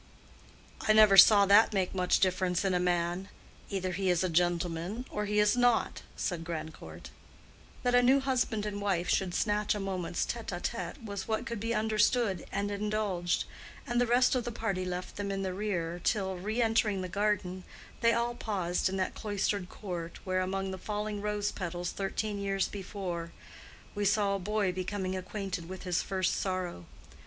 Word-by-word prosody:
"I 215 - +6
never 215 -2 +7
saw 200 +1 +9
that 205 +2 +6
make 185 -2 0
much 180 -1 +2
difference 185 -1 +1
in 190 - +2
a 180 - +2
man. 175 +1 0 0.4
Either 185 -2 -2
he 190 +1 -1
is 180 0 +2
a 185 - +1
gentleman, 175 +5 0
or 210 0 -2
he 210 0 -1
is 210 +2 +4
not," 245 -1 +2
said 175 -3 -2
Grandcourt. 155 - -7 0.7
That 245 - +2
a 245 - +6
new 260 +3 +5
husband 250 -5 0
and 205 -1 -4
wife 185 -3 0
should 185 -2 +1
snatch 210 0 +1
a - - -3
moment's 185 -3 -2
tête 235 -1 -5
à 175 - -3
tête 230 +2 -4
was 200 -2 -5
what 220 -1 -1
could 235 -2 -4
be 230 +2 -1
understood 215 -2 +1
and 205 +1 -1
indulged; 205 -4 -1 0.4
and 240 0 +1
the 245 - +2
rest 245 +2 +4
of 250 -2 +1
the 240 - -4
party 200 -5 -2
left 180 0 -5
them 205 -1 -3
in 195 0 -2
the 185 -1 -2
rear 175 -4 -2
till, 190 -3 0
re 215 +6 -1
entering 220 -3 +2
the - - -3
garden, 185 -1 -1 0.4
they 230 -1 +4
all 235 +1 0
paused 190 -7 -1
in 190 - -3
that 185 - -1
cloistered 205 -3 -2
court 175 -4 -6
where, 185 -1 0
among 190 +1 -2
the 190 - -6
falling 210 +1 -3
rose 210 0 -1
petals 175 -2 -4
thirteen 200 +1 -3
years 195 -1 0
before, 185 -4 -5 0.6
we 205 - -2
saw 205 0 +2
a 195 - -1
boy 205 0 0
becoming 185 +1 -3
acquainted 185 -2 -4
with 185 0 -7
his 180 -2 0
first 185 -1 0
sorrow. 185 - -3
195 Hz, 185 wpm, -30 LUFS, 180-210 Hz, 0.7 s, saw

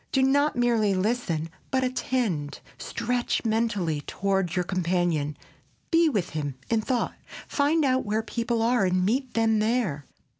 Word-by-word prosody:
Do 265 - +3
not 285 +3 +3
merely 230 -5 +2
listen, 185 -6 -1 0.2
but 260 -1 +1
attend, 240 - -1 0.2
stretch 245 -1 -1
mentally 210 -9 0
toward 195 -3 0
your 180 - +1
companion, 175 -5 0 0.5
be 330 -1 +5
with 200 - -1
him 145 -3 -3 0.2
in 225 -1 +3
thought. 245 +2 -1 0.3
"Find 300 +2 +2
out 260 -1 +2
where 215 +1 -1
people 230 0 -1
are 240 -1 +3
and 185 -1 +2
meet 255 +5 -1
them 225 -1 +3
there." 215 - 0
220 Hz, 145 wpm, -26 LUFS, 180-250 Hz, 0.5 s, be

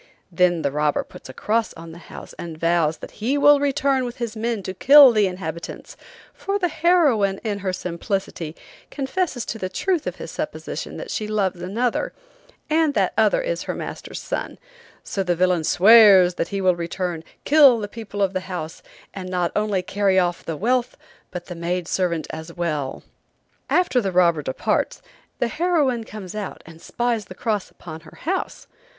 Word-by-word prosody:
Then 175 -1 +2
the 140 - 0
robber 150 0 0
puts - - -14
a - - -8
cross 225 +1 -1
on 165 0 -10
the 170 - -11
house - - -11
and 165 -2 -7
vows 165 -1 +1
that - - -10
he 260 +6 +1
will 290 0 +6
return 280 -2 +1
with 240 0 -5
his 235 -2 -4
men 225 -2 -2
to 185 - -5
kill 275 +6 +8
the 210 -3 +3
inhabitants, 170 -3 -7 0.4
for 395 +1 -2
the 360 -3 0
heroine, 300 - +3
in 210 -3 -2
her 190 -1 -2
simplicity, 180 -2 -4 0.3
confesses 280 -2 -2
to 225 - -5
the 185 - -3
truth 345 - -1
of - - -3
his - - -8
supposition - - -5
that - - -7
she 215 - -3
loves 195 -4 -1
another, 225 +7 -1 0.5
and 310 -1 +2
that - - +1
other - - +3
is - - -2
her - - -4
master's - - -7
son, - - -4 0.5
so 195 - -3
the 180 -2 0
villain 180 -1 +2
swears 195 -1 +7
that 170 - -2
he 200 -1 -3
will 185 -1 +3
return, 170 -1 -4 0.2
kill 285 -5 +7
the 210 -2 -4
people 205 -2 -4
of 195 -1 0
the 185 - 0
house, 165 -3 -5 0.3
and 185 -2 -7
not 180 -2 0
only 210 -3 0
carry 195 0 +1
off 175 -2 +1
the 165 -2 -4
wealth 245 +5 0 0.3
but 180 -1 -7
the 180 - -7
maidservant 170 0 -1
as 160 +1 -7
well. 150 -6 -3 0.7
After 350 -9 +2
the 195 -3 -2
robber 170 -3 +3
departs, 130 -2 -2 0.3
the 240 - 0
heroine 285 -5 0
comes 195 -5 -8
out, 210 -2 -6
and 165 0 -14
spies 235 -1 -2
the 185 - -11
cross 210 -1 -2
upon 160 -2 -10
her 165 - -16
house. 370 +4 -3
195 Hz, 180 wpm, -22 LUFS, 175-245 Hz, 0.7 s, kill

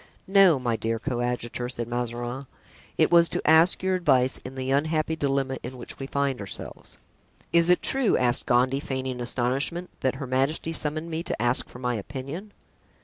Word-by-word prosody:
"No, 195 -5 +6
my 120 -3 -1
dear 115 +1 -1
coadjutor," 120 -1 -3
said 120 -2 -5
Mazarin; 120 +2 -4 0.5
"it - - +3
was 170 -1 +6
to - - -3
ask 160 +4 +5
your 190 0 +1
advice 135 -8 +2
in 130 - -8
the 130 0 -3
unhappy 155 +3 +1
dilemma 135 -3 -1
in 125 +2 -7
which 120 - -9
we 135 - -5
find 140 -2 -1
ourselves." 100 -1 -6 0.6
"Is 170 0 +4
it 180 - +4
true," 265 -5 +2
asked 125 0 +1
Gondy, 130 +2 +3
feigning 130 -2 -4
astonishment, 135 +9 -1
"that 130 0 0
her 135 - -5
majesty 135 +6 -1
summoned 155 +2 -3
me 160 +1 -2
to - - -4
ask 120 +2 0
for - - -11
my 125 0 -1
opinion?" 140 - -6
135 Hz, 175 wpm, -26 LUFS, 125-160 Hz, 0.6 s, No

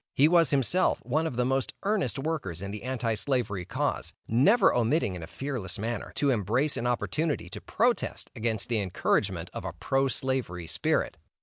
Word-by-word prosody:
He 145 - +6
was 165 -3 +5
himself, 140 +7 +2
one 155 +6 +1
of 135 - -5
the 125 +1 +1
most 135 0 0
earnest 200 -6 0
workers 135 - -3
in 100 - -4
the 105 0 -6
Anti 120 -3 -1
slavery 110 -6 -1
cause, - - -2
never 165 - +5
omitting 120 - +2
in 90 - -6
a 80 - -7
fearless 125 -10 -4
manner, 115 +1 -3
to 140 -2 +2
embrace 120 +6 +1
an 120 - -1
opportunity 120 - -1
to - - -6
protest - - 0
against 110 -2 -1
the 115 -2 +1
encouragement 95 -3 0
of - - -5
a - - -4
pro 135 0 +1
slavery 130 -10 -2
spirit. - - 0
125 Hz, 180 wpm, -28 LUFS, 105-145 Hz, -, He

